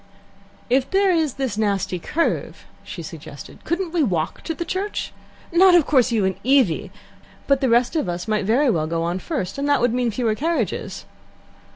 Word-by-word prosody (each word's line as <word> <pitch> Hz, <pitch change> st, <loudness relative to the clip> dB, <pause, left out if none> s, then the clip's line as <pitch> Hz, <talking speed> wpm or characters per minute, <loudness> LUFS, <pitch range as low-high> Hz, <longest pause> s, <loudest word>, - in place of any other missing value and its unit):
"If 260 Hz, +2 st, +1 dB
there 390 Hz, 0 st, +3 dB
is 320 Hz, -6 st, +1 dB
this 260 Hz, -6 st, -3 dB
nasty 200 Hz, -4 st, 0 dB
curve," 330 Hz, -, -2 dB, 0.2 s
she -, -, -8 dB
suggested, -, -, -10 dB
"couldn't 345 Hz, 0 st, -2 dB
we 345 Hz, -1 st, +1 dB
walk 175 Hz, -, -1 dB
to 325 Hz, -, -3 dB
the 340 Hz, -, -4 dB
church? 395 Hz, +4 st, -3 dB, 0.4 s
Not, 360 Hz, +1 st, +6 dB
of 335 Hz, -5 st, +5 dB
course, 255 Hz, -4 st, +3 dB
you 215 Hz, -4 st, +1 dB
and 190 Hz, -1 st, -1 dB
Evie; 255 Hz, -, +2 dB, 0.6 s
but 275 Hz, -1 st, +2 dB
the 265 Hz, -, +2 dB
rest 240 Hz, +6 st, +2 dB
of 305 Hz, -, 0 dB
us 175 Hz, +3 st, -4 dB
might 215 Hz, -2 st, 0 dB
very 250 Hz, +5 st, +3 dB
well 155 Hz, -5 st, 0 dB
go 165 Hz, 0 st, -1 dB
on 175 Hz, +2 st, -2 dB
first, 270 Hz, -, -4 dB
and 285 Hz, +1 st, -1 dB
that 285 Hz, -, +4 dB
would 240 Hz, -1 st, +2 dB
mean 245 Hz, -1 st, +1 dB
fewer 225 Hz, 0 st, 0 dB
carriages." 325 Hz, +9 st, -2 dB
255 Hz, 190 wpm, -22 LUFS, 205-320 Hz, 0.6 s, Not